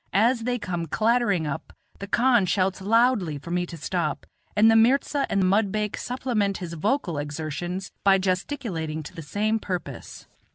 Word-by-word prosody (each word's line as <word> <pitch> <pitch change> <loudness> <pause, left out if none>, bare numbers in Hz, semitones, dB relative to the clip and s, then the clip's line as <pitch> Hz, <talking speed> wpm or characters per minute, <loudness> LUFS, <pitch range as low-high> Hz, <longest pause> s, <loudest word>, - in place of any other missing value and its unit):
As 230 +2 +3
they 245 0 0
come 175 -6 -4
clattering 215 -3 +2
up, 150 +1 -5 0.3
the 200 - -6
khan 240 -3 +3
shouts 190 0 0
loudly 215 - +2
for 155 +4 -9
me 175 0 0
to 170 - -8
stop, 155 -1 -2 0.3
and 220 +2 +6
the - - +4
mirza 270 +5 +3
and 195 -1 +2
mudbake 210 +2 +1
supplement 240 -6 -1
his 175 -2 -6
vocal 175 - -1
exertions 160 +5 -4
by 195 -1 +6
gesticulating 185 - -2
to - - -10
the 165 - -7
same 210 +9 0
purpose. 175 - -6
195 Hz, 160 wpm, -25 LUFS, 170-225 Hz, 0.3 s, and